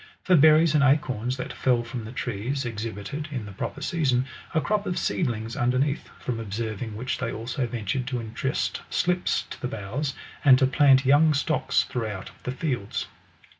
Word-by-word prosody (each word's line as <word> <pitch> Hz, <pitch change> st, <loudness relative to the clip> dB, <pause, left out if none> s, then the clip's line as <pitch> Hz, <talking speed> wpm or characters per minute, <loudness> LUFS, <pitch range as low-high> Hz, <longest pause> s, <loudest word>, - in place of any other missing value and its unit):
For 185 Hz, -, +4 dB
berries 155 Hz, +1 st, +6 dB
and 150 Hz, -2 st, +4 dB
acorns 130 Hz, -3 st, +2 dB
that 130 Hz, -, -5 dB
fell 125 Hz, -2 st, +2 dB
from 120 Hz, -1 st, -6 dB
the 110 Hz, -, -7 dB
trees, 125 Hz, +3 st, -3 dB
ex 115 Hz, -2 st, -4 dB
hibited, 115 Hz, +9 st, -5 dB
in 125 Hz, -6 st, -4 dB
the 100 Hz, -, -8 dB
proper 95 Hz, -, -5 dB
season, 130 Hz, -7 st, +1 dB, 0.3 s
a 160 Hz, -, +2 dB
crop 210 Hz, +4 st, 0 dB
of 180 Hz, -, -1 dB
seedlings 115 Hz, -8 st, -1 dB
underneath; 130 Hz, +4 st, 0 dB
from 120 Hz, -2 st, -3 dB
observing 110 Hz, +1 st, -4 dB
which 125 Hz, +4 st, -3 dB
they -, -, -2 dB
also 120 Hz, +3 st, -3 dB
ventured 120 Hz, +2 st, -2 dB
to 125 Hz, -3 st, -2 dB
intrust 115 Hz, +5 st, -2 dB
slips 180 Hz, 0 st, +1 dB
to -, -, -8 dB
the -, -, -1 dB
boughs, 125 Hz, +6 st, -3 dB, 0.3 s
and 130 Hz, -3 st, +8 dB
to 130 Hz, -, +4 dB
plant 135 Hz, 0 st, +5 dB
young 150 Hz, +3 st, +5 dB
stocks 140 Hz, -2 st, +1 dB
throughout 110 Hz, -6 st, -4 dB
the 125 Hz, -, -1 dB
fields. 130 Hz, -7 st, -3 dB
130 Hz, 175 wpm, -26 LUFS, 115-145 Hz, 0.3 s, and